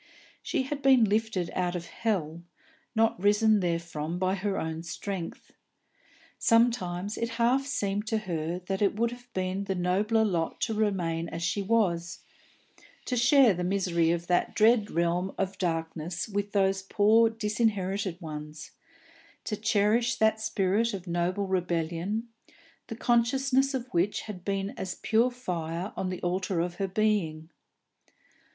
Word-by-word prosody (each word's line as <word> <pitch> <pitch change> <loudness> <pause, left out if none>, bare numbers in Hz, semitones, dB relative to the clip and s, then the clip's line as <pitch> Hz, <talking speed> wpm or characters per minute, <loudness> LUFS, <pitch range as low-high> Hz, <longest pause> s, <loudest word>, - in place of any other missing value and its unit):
She - - -1
had 280 +2 -4
been 265 -3 +6
lifted 210 -4 0
out 180 -1 -1
of 170 -1 -4
hell, 170 -8 -2 0.5
not 225 -4 +2
risen 210 +1 +4
therefrom 170 -2 -2
by 185 +1 +1
her 195 0 -2
own 160 0 -3
strength. 175 +2 -6 0.9
Sometimes 210 -5 +2
it 230 - -1
half 255 +4 +2
seemed 205 -5 -2
to 220 - +1
her 170 -5 -3
that 195 +1 -2
it 200 -1 +2
would 230 +2 +1
have 245 0 -12
been 185 +1 -2
the 195 -1 -2
nobler 205 +5 +2
lot 170 -5 -1
to 225 - 0
remain 175 -6 -1
as 170 - -5
she 185 +4 0
was, 190 -5 0 0.8
to 250 - -1
share 245 -1 +5
the 180 0 -3
misery 180 -3 +1
of 170 0 0
that 175 0 +1
dread 215 0 +4
realm 170 +3 0
of 195 0 -2
darkness 165 -1 -2
with 205 -1 -3
those 195 -1 +2
poor 215 +3 +4
disinherited 210 -4 -1
ones, 150 -2 -8 0.7
to 210 - -2
cherish 220 +3 +2
that 220 0 +2
spirit 210 +2 +1
of 185 -2 -8
noble 175 +3 -1
rebellion, 180 +3 -1 0.6
the 225 - -6
consciousness 265 +4 +2
of 250 -2 -3
which 180 +3 0
had 195 -5 -8
been 195 0 -2
as 190 - -4
a - - -25
pure 230 +3 +3
fire 180 -6 -4
on 185 - -2
the 185 - -4
altar 185 0 -1
of 175 +1 -2
her 195 - -1
being. 180 -6 0
195 Hz, 150 wpm, -28 LUFS, 175-220 Hz, 0.9 s, been